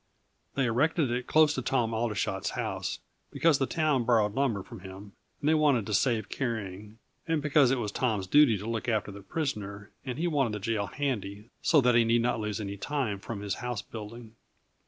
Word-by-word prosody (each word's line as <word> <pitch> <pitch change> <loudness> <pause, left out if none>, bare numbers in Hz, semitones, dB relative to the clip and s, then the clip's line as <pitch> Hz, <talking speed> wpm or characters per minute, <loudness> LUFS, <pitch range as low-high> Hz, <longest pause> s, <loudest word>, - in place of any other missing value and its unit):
They 135 - +2
erected 135 +4 +2
it 125 +1 -2
close 155 -1 +5
to 130 - -2
Tom 120 -3 0
Aldershot's 105 -4 -1
house, - - -3 0.3
because 160 -2 +3
the 135 - +1
town 155 -6 +1
borrowed 110 -3 +3
lumber 115 -7 0
from 115 - -11
him 95 +2 -10 0.3
and 150 - -2
they 155 - +5
wanted 145 -8 +3
to 105 - -4
save 110 -1 +2
carrying, 105 -4 -4 0.3
and 165 -1 +1
because 145 -2 +4
it 135 - +2
was 105 -4 -2
Tom's 110 -5 0
duty 125 +1 +5
to 100 - -8
look 115 0 -2
after 105 -3 0
the 100 0 -10
prisoner, 105 - -4
and 130 -2 -4
he 165 - -1
wanted 140 -9 +1
the 105 - -3
jail 105 0 -1
handy, 105 -4 -4
so 155 -4 +4
that 125 -1 +4
he 120 0 +5
need 115 +1 +2
not 120 -1 +1
lose 105 -1 -3
any 100 -1 -5
time 125 -5 -2
from 100 0 -6
his 100 -1 -2
house 125 -4 -3
building. 110 +1 -9
115 Hz, 200 wpm, -29 LUFS, 105-135 Hz, 0.3 s, close